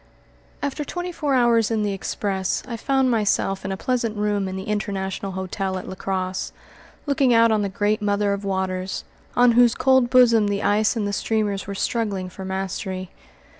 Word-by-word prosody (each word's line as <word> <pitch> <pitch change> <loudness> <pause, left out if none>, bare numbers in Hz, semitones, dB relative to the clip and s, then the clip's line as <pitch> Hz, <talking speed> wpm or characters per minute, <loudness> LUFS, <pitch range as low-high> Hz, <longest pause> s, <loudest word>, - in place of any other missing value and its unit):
After 285 +1 -2
twenty 355 +4 -4
four 295 -5 -1
hours 235 -3 +3
in 220 -2 0
the 205 -1 0
express 195 -1 -2
I 240 - -4
found 265 +2 +1
myself 205 -3 +1
in 195 - -3
a 190 - -3
pleasant 235 -2 -1
room 205 -1 0
in 190 - -4
the 190 - -4
International 195 -2 -3
Hotel 190 +1 -3
at 185 - -7
La - - -5
Crosse, 185 0 -3 0.5
looking 275 -4 +3
out 230 0 +5
on 215 -1 +2
the 200 - -1
Great 210 +1 0
Mother 205 0 +1
of 200 0 -4
Waters, 190 -1 -2 0.3
on 245 0 +6
whose 240 0 +5
cold 260 -2 +3
bosom 235 -4 +5
the 205 0 -1
ice 210 +2 +2
and 220 -3 -1
the 200 - -3
steamers 205 -2 -1
were 200 - -4
struggling 200 -4 -1
for 190 +2 -9
mastery. 190 -1 -4
205 Hz, 185 wpm, -23 LUFS, 190-235 Hz, 0.5 s, on